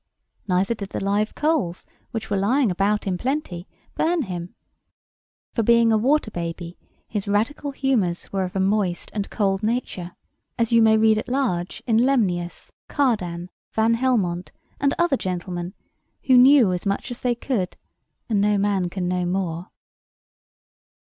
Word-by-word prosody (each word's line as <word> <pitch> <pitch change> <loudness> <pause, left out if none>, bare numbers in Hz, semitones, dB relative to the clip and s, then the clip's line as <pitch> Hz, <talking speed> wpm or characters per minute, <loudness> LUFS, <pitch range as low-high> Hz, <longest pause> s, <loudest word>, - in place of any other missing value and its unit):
Neither 190 +4 +1
did 200 -3 -7
the - - -4
live 205 +2 0
coals, 295 - 0 0.2
which 220 -2 -5
were - - +2
lying 220 +4 +2
about 200 +3 0
in 185 -2 -1
plenty, 245 - -3 0.3
burn 330 -1 +1
him; 180 -4 -6 1.0
for, 230 - +1
being 230 +1 +4
a 220 - +4
water 265 0 +2
baby, 170 0 -5 0.3
his 205 -2 -4
radical 225 +8 0
humours 245 -13 -1
were 195 -1 0
of 180 0 -5
a - - 0
moist 190 -2 0
and 205 -2 -3
cold 195 -2 0
nature, 215 -6 -3 0.4
as 230 0 0
you 230 0 +5
may 220 0 +5
read 220 0 +4
at 235 - -7
large 240 -10 -1
in 225 -3 +2
Lemnius, 200 -10 0 0.2
Cardan, 180 - -1 0.2
Van 225 +1 +3
Helmont, 210 -8 0 0.3
and 280 0 +1
other 345 -6 +2
gentlemen, 180 -1 -4 0.5
who 260 - +4
knew 250 -5 +7
as 180 +3 -3
much 200 +6 -2
as 245 - -6
they 245 -1 0
could, 230 -7 -2 0.5
and 210 -4 +1
no 205 0 +3
man 195 -3 +1
can 180 0 -3
know 180 0 0
more. 175 -2 -2
205 Hz, 155 wpm, -23 LUFS, 180-240 Hz, 1.0 s, knew